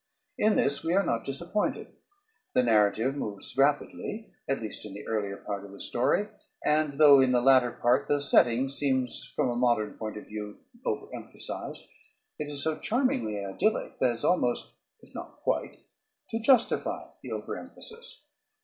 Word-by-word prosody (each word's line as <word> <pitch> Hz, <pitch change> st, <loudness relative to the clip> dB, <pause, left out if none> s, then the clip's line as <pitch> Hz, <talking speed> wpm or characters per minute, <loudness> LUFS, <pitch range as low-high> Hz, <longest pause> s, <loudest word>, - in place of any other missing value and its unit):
In 215 Hz, -5 st, +3 dB
this 140 Hz, +1 st, +2 dB
we 165 Hz, +2 st, +1 dB
are 195 Hz, -, +3 dB
not 115 Hz, -, 0 dB
disappointed. 170 Hz, +9 st, -2 dB, 0.7 s
The 125 Hz, -, +5 dB
narrative 110 Hz, +3 st, +3 dB
moves 105 Hz, -8 st, -5 dB
rapidly, 145 Hz, +10 st, 0 dB, 0.2 s
at 135 Hz, -, +1 dB
least 110 Hz, -2 st, -5 dB
in 100 Hz, -2 st, -8 dB
the 105 Hz, -, -8 dB
earlier 100 Hz, -3 st, -2 dB
part 100 Hz, -1 st, -5 dB
of 100 Hz, -, -11 dB
the 100 Hz, -, -12 dB
story; 130 Hz, +12 st, +1 dB, 0.4 s
and, 150 Hz, -2 st, +2 dB
though 145 Hz, -2 st, +8 dB
in 130 Hz, -1 st, +3 dB
the 125 Hz, -, +4 dB
latter 130 Hz, -1 st, +5 dB
part 125 Hz, +4 st, +2 dB
the 145 Hz, -, +2 dB
setting 130 Hz, -2 st, +4 dB
seems 135 Hz, -2 st, -1 dB
from 125 Hz, -, +1 dB
a -, -, -3 dB
modern 120 Hz, -4 st, +1 dB
point 110 Hz, -1 st, -5 dB
of 105 Hz, -, -9 dB
view 105 Hz, -1 st, -7 dB, 0.3 s
over -, -, -2 dB
emphasized, -, -, -6 dB, 0.6 s
it 150 Hz, -, -3 dB
is 145 Hz, -1 st, -2 dB
so 160 Hz, -1 st, -1 dB
charmingly 115 Hz, -, 0 dB
idyllic 155 Hz, -, 0 dB
as 120 Hz, -2 st, +2 dB
almost, 125 Hz, -9 st, +1 dB, 0.3 s
if -, -, -18 dB
not -, -, -8 dB
quite, -, -, -1 dB, 0.5 s
to 225 Hz, -, -2 dB
justify 240 Hz, 0 st, +3 dB, 0.2 s
the -, -, -8 dB
over -, -, -4 dB
emphasis. 470 Hz, +1 st, -9 dB
130 Hz, 165 wpm, -28 LUFS, 110-150 Hz, 0.7 s, though